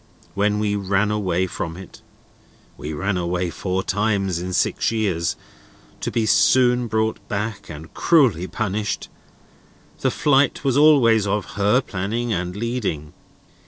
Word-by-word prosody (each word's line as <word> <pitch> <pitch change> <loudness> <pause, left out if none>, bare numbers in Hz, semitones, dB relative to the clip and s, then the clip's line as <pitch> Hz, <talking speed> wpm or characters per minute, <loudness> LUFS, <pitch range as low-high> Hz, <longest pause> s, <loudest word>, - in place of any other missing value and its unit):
When 105 +1 +1
we 105 -1 0
ran 100 +1 0
away 95 -4 0
from 85 -2 -5
it 95 -1 -12 0.7
(we 75 - -6
ran 95 +5 -2
away 90 0 -2
four 95 +1 -2
times 100 -4 0
in 90 +1 -5
six - - +1
years, 95 -7 -1 0.6
to - - -3
be 115 - 0
soon 125 +2 +3
brought 110 0 -1
back 105 -1 -4
and 80 0 -10
cruelly 125 - +3
punished), 105 0 -3 0.9
the - - +1
flight 140 -2 +2
was 135 -3 +1
always 125 -8 +5
of 105 +1 -2
her 105 +6 +2
planning 110 +3 -3
and 90 -1 -3
leading. 105 -10 -3
105 Hz, 135 wpm, -22 LUFS, 90-115 Hz, 0.9 s, always